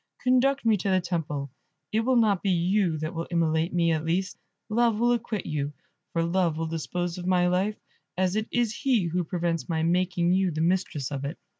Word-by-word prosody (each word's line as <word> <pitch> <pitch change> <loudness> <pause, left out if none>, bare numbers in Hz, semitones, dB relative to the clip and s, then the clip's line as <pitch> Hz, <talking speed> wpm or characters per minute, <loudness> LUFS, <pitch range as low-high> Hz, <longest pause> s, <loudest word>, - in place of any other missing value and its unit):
Conduct 255 +1 +3
me 220 -2 +4
to 195 - -2
the 185 -1 +3
temple, 155 -6 -3 0.4
it 220 - +2
will 255 +3 +2
not 215 -6 +3
be 200 - 0
you 180 -1 +2
that 155 +3 -4
will 165 0 -4
immolate 165 -1 +1
me, 170 -1 +2
at 155 -1 0
least; 180 +3 -1 0.3
Love 230 0 +2
will 240 +2 +3
acquit 230 -4 -2
you, 145 -2 -2 0.4
for 165 - 0
Love 170 -2 +1
will 165 - -1
dispose 170 +2 -3
of 180 - -5
my 180 -1 +3
life, 190 +4 +1 0.4
as 185 +1 +1
it 215 +1 -1
is 240 -2 0
he 250 -7 +2
who 175 +2 -1
prevents 170 0 -2
my 160 -1 0
making 175 0 +1
you 190 0 +2
the 155 -2 -4
mistress 165 -5 0
of 140 -1 -4
it." 140 +5 -4
180 Hz, 205 wpm, -26 LUFS, 165-210 Hz, 0.4 s, me